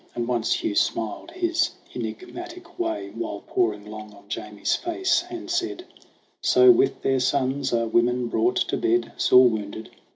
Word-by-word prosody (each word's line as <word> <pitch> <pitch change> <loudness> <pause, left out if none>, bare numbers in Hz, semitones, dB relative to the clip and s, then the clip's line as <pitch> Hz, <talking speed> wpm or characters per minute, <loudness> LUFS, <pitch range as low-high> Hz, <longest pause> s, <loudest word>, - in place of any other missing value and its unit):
And 120 -1 -2
once 120 -2 0
Hugh - - -1
smiled 110 - -1
his 340 -1 0 0.2
enfgmatic 355 -1 -7
way, 340 +1 -2
While 330 -2 -5
poring 325 - 0
long 105 0 -9
on 100 - -17
Jamie's 105 -1 -2
face, 345 0 0
and 350 -1 -7
said: 355 0 -2 0.6
"So 380 0 +6
with 380 +3 +2
their 135 -1 +2
sons 135 +1 0
are 115 -1 +1
women 120 +2 +2
brought 360 - +1
to - - 0
bed, 360 0 +1
Sore 125 0 +6
wounded 110 -1 -4
320 Hz, 155 wpm, -24 LUFS, -, 0.6 s, So